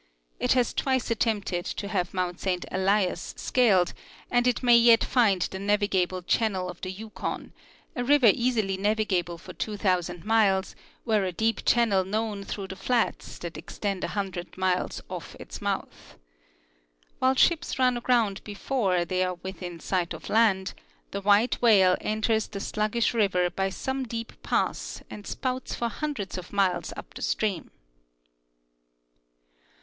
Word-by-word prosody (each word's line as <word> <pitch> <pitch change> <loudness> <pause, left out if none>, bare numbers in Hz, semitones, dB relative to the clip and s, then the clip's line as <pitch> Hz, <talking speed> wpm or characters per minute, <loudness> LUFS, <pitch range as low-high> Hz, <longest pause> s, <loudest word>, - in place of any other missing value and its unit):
It - - +3
has 250 -2 +1
twice 260 -3 0
attempted 205 -6 0
to 200 - -4
have 185 -4 -1
mount 180 -1 -2
Saint 180 -2 -1
Elias 190 -1 0
scaled, 200 -8 +3 0.4
and 245 0 +3
it 250 +1 +1
may 240 -1 +7
yet 235 -1 +6
find 205 -8 +3
the 190 - -4
navigable 195 -3 +1
channel 190 -2 0
of 175 - -16
the 185 - -4
Yukon, 215 +3 -6 0.4
a 245 - -1
river 260 -4 +6
easily 225 -6 0
navigable 195 -4 0
for - - -11
two 210 -1 -4
thousand 180 -3 0
miles 205 -4 +2 0.3
were 215 -4 +2
a 185 - -1
deep 225 +5 0
channel 225 -6 +3
known 210 +1 -2
through 195 -1 -5
the 190 - -6
fiats 230 +5 -1
that 170 -1 -7
extend 195 -3 -4
a - - 0
hundred 185 -3 -4
miles 185 -1 0
ofi' - - -7
its - - -9
mouth. - - -4 1.0
While 260 +1 +3
ships 340 +5 +2
run 255 -1 +3
aground 235 -5 +1
before 200 -4 0
they 185 +1 0
are 185 0 -1
within 180 -1 -7
sight 180 0 -1
of - - -10
land, 205 -4 +3 0.4
the 200 - -3
white 205 +4 +3
whale 195 -6 +6
enters 220 0 0
the 200 - -6
slug 215 +1 -2
gish 235 0 +2
river 180 -5 +2
by 195 0 -1
some 265 +7 -3
deep 230 0 -5
pass - - -1
and 205 - -9
spouts 255 -1 -3
for 235 - -1
hundreds 230 -9 -4
of 180 - -11
miles 195 -3 +1
uja - - -6
the - - -9
stream. 200 -6 -1
205 Hz, 155 wpm, -27 LUFS, 185-230 Hz, 1.0 s, may